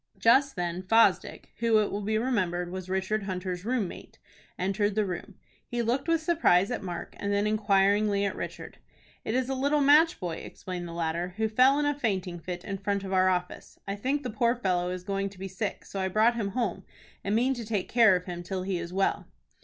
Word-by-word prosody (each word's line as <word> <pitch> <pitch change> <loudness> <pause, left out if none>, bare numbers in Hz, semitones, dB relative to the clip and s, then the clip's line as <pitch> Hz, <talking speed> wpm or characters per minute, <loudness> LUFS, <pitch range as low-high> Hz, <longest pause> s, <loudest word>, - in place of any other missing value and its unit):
Just 270 +4 +4
then 175 0 -2
Fosdick, 225 +5 +2
who, 230 -1 +3
it 210 -1 +1
will 205 - -3
be 215 +2 0
remembered, 185 -8 -1
was 185 0 -6
Richard 190 +3 -1
Hunter's 180 -2 -4
room 230 -3 0
mate, - - -11 0.4
entered 195 +2 0
the 215 -1 +2
room. 180 -3 -6 0.3
He 240 -1 -2
looked 240 +7 -1
with 330 -1 +2
surprise 250 - +3
at 245 - -2
Mark, 175 -3 -6
and 200 - -2
then 200 +1 +1
inquiringly 205 -1 +2
at 195 - -2
Richard. - - -7 0.4
"It 220 - -2
is 255 -1 +1
a 270 - -1
little 280 +3 +1
match 295 +4 +5
boy," 175 -3 -4
explained 180 -2 -7
the - - -8
latter, 170 +2 -2
"who 220 0 +1
fell 255 +6 +4
in 295 - +1
a 290 - +2
fainting 190 -10 -2
fit 175 +1 -6
in 195 -1 -4
front 200 0 -1
of 190 0 -4
our 185 0 +4
office. 180 -1 -3
I 195 - -2
think 270 +7 -1
the 250 - -3
poor 235 +2 +2
fellow 180 -6 0
is 180 0 -5
going 195 +1 -2
to 195 - -16
be 190 +1 -5
sick, 190 +2 -4
so 195 - -6
I 190 - 0
brought 215 +5 +3
him 200 -4 -3
home, 195 -6 -1 0.4
and 200 +2 0
mean 250 +4 +2
to 240 -2 -6
take 210 -3 -2
care 225 -5 +5
of 180 0 -3
him 175 -1 -5
till 185 +1 -4
he 185 -2 -2
is 170 0 -6
well." 195 +1 0
200 Hz, 225 wpm, -28 LUFS, 185-230 Hz, 0.4 s, match